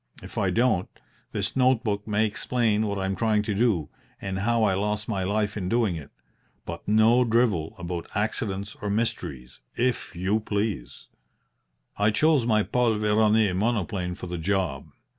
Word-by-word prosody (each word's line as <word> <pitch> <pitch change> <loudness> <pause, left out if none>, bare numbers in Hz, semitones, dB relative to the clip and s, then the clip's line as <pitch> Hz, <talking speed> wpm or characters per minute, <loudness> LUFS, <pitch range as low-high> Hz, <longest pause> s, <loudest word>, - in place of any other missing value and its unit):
If - - -10
I - - +1
don't, 115 -7 +2 0.4
this - - -2
note 130 -2 +3
book 105 -2 -2
may 105 +1 +2
explain 110 0 0
what 100 0 -2
I 95 - -1
am 95 0 -1
trying 105 +1 +1
to 105 - -2
do, 100 -7 +1 0.3
and 95 -1 -3
how 115 +3 +2
I 100 -3 +3
lost 105 +2 -1
my 100 -4 -1
life 105 +2 0
in 90 -4 -3
doing 115 -5 +1
it. 75 -3 -8 0.6
But - - -7
no 110 +4 +5
drivel 110 -9 +1
about 85 -1 -5
accidents 100 -2 -2
or 105 - -2
mysteries, 100 - -3 0.2
if 125 -5 -1
you 95 +5 +1
please. 100 - -3 0.9
"I 105 +1 +3
chose 135 +3 +3
my 110 -2 +3
Paul 120 -1 +1
Veroner 105 -1 +3
monoplane 100 -4 -1
for 90 - -8
the 90 -1 -4
job. 90 -6 -1
105 Hz, 165 wpm, -26 LUFS, 95-115 Hz, 0.9 s, no